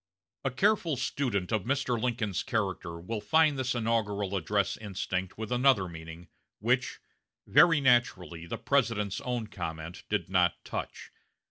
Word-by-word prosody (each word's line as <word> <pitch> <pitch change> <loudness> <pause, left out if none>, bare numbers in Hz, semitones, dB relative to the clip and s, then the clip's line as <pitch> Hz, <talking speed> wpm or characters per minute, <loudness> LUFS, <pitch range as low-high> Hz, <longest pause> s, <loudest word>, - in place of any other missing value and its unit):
A 135 - +1
careful 170 - +1
student 120 -8 -1
of 110 -2 +1
Mr. 130 -3 0
Lincoln's 115 -6 -1
character 95 -8 -2
will 105 +5 -4
find 145 +6 +3
this 125 -1 -1
inaugural 105 -4 0
address 100 +2 0
instinct 95 -2 -4
with 110 +1 -5
another 125 -6 +4
meaning, 80 0 -10 0.3
which, - - 0 0.5
very 165 -3 +6
naturally, 95 -10 +1
the 115 - -4
President's 115 -5 0
own 125 -4 -2
comment 85 -4 -6
did 105 0 0
not 90 -2 +1
touch. - - -6
110 Hz, 135 wpm, -29 LUFS, 95-125 Hz, 0.5 s, very